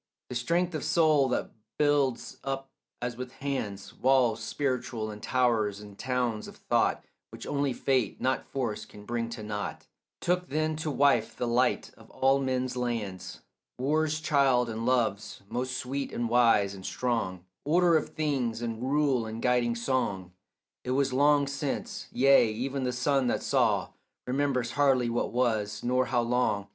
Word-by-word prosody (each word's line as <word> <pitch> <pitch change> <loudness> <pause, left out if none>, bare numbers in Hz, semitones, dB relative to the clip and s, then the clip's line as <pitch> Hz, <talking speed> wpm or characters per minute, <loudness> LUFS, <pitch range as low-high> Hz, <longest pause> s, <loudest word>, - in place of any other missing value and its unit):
The 125 - -5
strength 170 +8 0
of 155 - -3
soul 155 -5 +3
that 125 - -1 0.3
builds 140 -5 +1
up 135 0 -4 0.3
as 120 -1 -2
with 125 +1 -7
hands 110 -8 -4
Walls 125 -3 +2
spiritual 125 -5 -2
and 105 0 -10
towers 115 -5 +1
and 105 -1 -11
towns 125 -2 -1
of - - -11
thought - - 0 0.2
Which - - -9
only 140 -1 0
fate, 130 -4 0
not 130 - 0
force, 115 -6 -3
can 105 -1 -13
bring 115 0 -2
to 115 -2 -7
nought, 105 -1 -5 0.3
Took 180 +1 0
then 155 +2 0
to 155 0 -3
wife 140 -6 +2
the 120 - -2
light 120 +2 +1
of - - -17
all 135 +1 +2
men's 130 -1 -1
lands, 115 -7 -4 0.4
War's 155 +4 +1
child 135 -6 +2
and 115 +2 -3
love's, 115 -6 0
most 125 +1 -2
sweet 135 +2 -3
and 120 - -2
wise 115 -4 +4
and 95 -1 -10
strong, 95 -7 -2 0.2
Order 170 +3 +4
of 155 - +1
things 130 -7 -1
and 115 -1 -4
rule 135 -3 +1
and 110 +1 -6
guiding 120 -1 +2
song. 115 -7 -1 0.5
It 125 - -3
was 135 -2 +1
long 145 +1 +4
since: 140 0 -4
yea, 130 -3 +5
even 130 +4 -3
the 125 - 0
sun 130 +1 +1
that - - 0
saw - - +2 0.4
Remembers 130 -2 0
hardly 130 -4 +3
what 120 - -1
was, 110 -4 0
nor 125 +1 +1
how 120 -1 +2
long. 115 -4 0
125 Hz, 160 wpm, -28 LUFS, 115-140 Hz, 0.5 s, yea